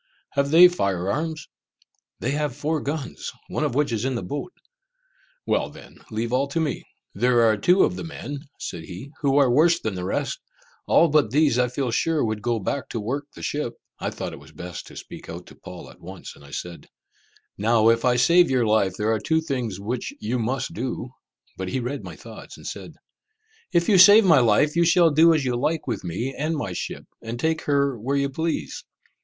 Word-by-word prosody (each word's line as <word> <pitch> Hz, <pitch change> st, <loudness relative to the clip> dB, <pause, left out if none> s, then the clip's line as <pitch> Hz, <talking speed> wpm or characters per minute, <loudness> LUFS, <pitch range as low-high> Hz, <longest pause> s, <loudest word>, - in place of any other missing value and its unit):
"Have 140 Hz, 0 st, 0 dB
they 170 Hz, +4 st, +9 dB
fire 100 Hz, -, -1 dB
arms?" 155 Hz, +2 st, -3 dB, 0.7 s
"They 125 Hz, -, -1 dB
have 145 Hz, -3 st, -1 dB
four 150 Hz, +2 st, -1 dB
guns, 145 Hz, -1 st, -4 dB, 0.2 s
one -, -, -2 dB
of 145 Hz, -5 st, -1 dB
which 145 Hz, -2 st, +1 dB
is 110 Hz, -1 st, -1 dB
in 130 Hz, 0 st, -1 dB
the 115 Hz, -, -3 dB
boat." 145 Hz, -, -5 dB, 0.9 s
"Well -, -, 0 dB
then, -, -, -14 dB
leave 115 Hz, +2 st, -3 dB
all 135 Hz, +2 st, +2 dB
to 140 Hz, +4 st, -2 dB
me!" 160 Hz, -2 st, -2 dB, 0.3 s
"There 120 Hz, +3 st, +3 dB
are 110 Hz, -1 st, +4 dB
two 180 Hz, -, +4 dB
of -, -, +1 dB
the -, -, -6 dB
men," 145 Hz, -3 st, -6 dB, 0.2 s
said 80 Hz, -2 st, -6 dB
he, 95 Hz, +11 st, -9 dB
"who 140 Hz, -1 st, +2 dB
are 135 Hz, -4 st, +5 dB
worse 165 Hz, +6 st, +4 dB
than 110 Hz, -, -3 dB
the 90 Hz, -1 st, -5 dB
rest. 100 Hz, -, -2 dB, 0.5 s
All 170 Hz, -, +5 dB
but 150 Hz, -6 st, +3 dB
these 140 Hz, -1 st, +3 dB
I 125 Hz, -, +3 dB
feel 125 Hz, 0 st, -2 dB
sure 160 Hz, +3 st, +1 dB
would 110 Hz, -1 st, -2 dB
go 120 Hz, +1 st, 0 dB
back 115 Hz, +6 st, -3 dB
to 115 Hz, -, -3 dB
work 135 Hz, +7 st, -3 dB
the -, -, -10 dB
ship." 145 Hz, -5 st, -2 dB, 0.2 s
I -, -, -2 dB
thought -, -, -6 dB
it -, -, -9 dB
was -, -, -16 dB
best 90 Hz, 0 st, -8 dB
to -, -, -13 dB
speak -, -, -10 dB
out -, -, -7 dB
to -, -, -15 dB
Paul -, -, -10 dB
at -, -, -20 dB
once, 95 Hz, +2 st, -10 dB
and -, -, -17 dB
I 70 Hz, -, -14 dB
said, 85 Hz, +4 st, -7 dB, 0.7 s
"Now 110 Hz, +1 st, +3 dB
if 115 Hz, 0 st, +2 dB
I 125 Hz, -1 st, +3 dB
save 170 Hz, +8 st, +5 dB
your 130 Hz, -3 st, +2 dB
life, 105 Hz, -3 st, +2 dB
there 110 Hz, +1 st, +1 dB
are 110 Hz, -, 0 dB
two 160 Hz, +10 st, +1 dB
things 125 Hz, -, -3 dB
which 115 Hz, +5 st, -3 dB
you 115 Hz, +4 st, -2 dB
must 130 Hz, +8 st, -2 dB
do." 130 Hz, -4 st, -4 dB, 0.5 s
But 95 Hz, 0 st, -4 dB
he 130 Hz, -, -1 dB
read 130 Hz, +4 st, -4 dB
my -, -, -8 dB
thoughts, -, -, -11 dB
and -, -, -14 dB
said, -, -, -7 dB, 0.8 s
"If 170 Hz, 0 st, +2 dB
you 200 Hz, -4 st, +5 dB
save 205 Hz, +4 st, +9 dB
my 165 Hz, -6 st, +6 dB
life, 125 Hz, +6 st, +3 dB
you 170 Hz, -, +4 dB
shall 170 Hz, 0 st, +5 dB
do 160 Hz, +3 st, +6 dB
as 145 Hz, -4 st, 0 dB
you 125 Hz, -1 st, 0 dB
like 150 Hz, +5 st, -1 dB
with 115 Hz, -6 st, -3 dB
me 105 Hz, +10 st, -3 dB
and 155 Hz, +3 st, -1 dB
my 100 Hz, -10 st, -3 dB
ship, -, -, -5 dB, 0.2 s
and 115 Hz, +1 st, -6 dB
take 160 Hz, +3 st, 0 dB
her 140 Hz, -4 st, +1 dB
where 135 Hz, +6 st, -1 dB
you 140 Hz, 0 st, 0 dB
please." 160 Hz, +4 st, -3 dB
130 Hz, 220 wpm, -24 LUFS, 115-155 Hz, 0.9 s, they